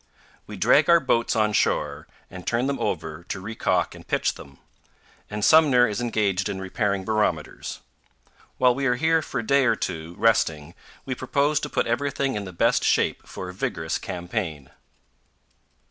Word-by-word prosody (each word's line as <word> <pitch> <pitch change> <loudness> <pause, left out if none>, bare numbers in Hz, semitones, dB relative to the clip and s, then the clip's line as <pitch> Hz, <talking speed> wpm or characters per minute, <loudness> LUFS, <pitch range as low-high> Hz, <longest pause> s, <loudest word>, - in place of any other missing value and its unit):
We - - -8
drag - - +4
our 170 0 +7
boats 120 -5 +1
on 105 -1 +2
shore 70 -6 0 0.2
and 90 -1 -10
turn 120 +2 +1
them 140 0 -2
over 80 +2 -3
to 95 - -5
recalk 110 +4 -1
and - - -14
pitch - - 0
them, 70 -1 -13 0.7
and 105 0 -2
Sumner 140 -6 +6
is 110 +2 -3
engaged 105 -5 0
in 95 - -4
repairing 95 0 -2
barometers. 105 -8 -2 0.8
While 125 -1 +4
we 135 +2 -1
are 125 - +2
here 160 +4 +2
for - - -4
a - - -10
day 140 +3 +3
or 125 - +3
two, 80 +2 -5
resting, 80 -8 +1 0.3
we 130 - -2
propose 145 +3 0
to 150 - -5
put - - 0
everything 135 +2 -1
in 105 -1 -4
the 95 - -7
best 85 - +2
shape - - +1
for 95 - -7
a - - -8
vigorous 80 -3 -3
campaign. 90 - -5
110 Hz, 170 wpm, -24 LUFS, 90-130 Hz, 0.8 s, our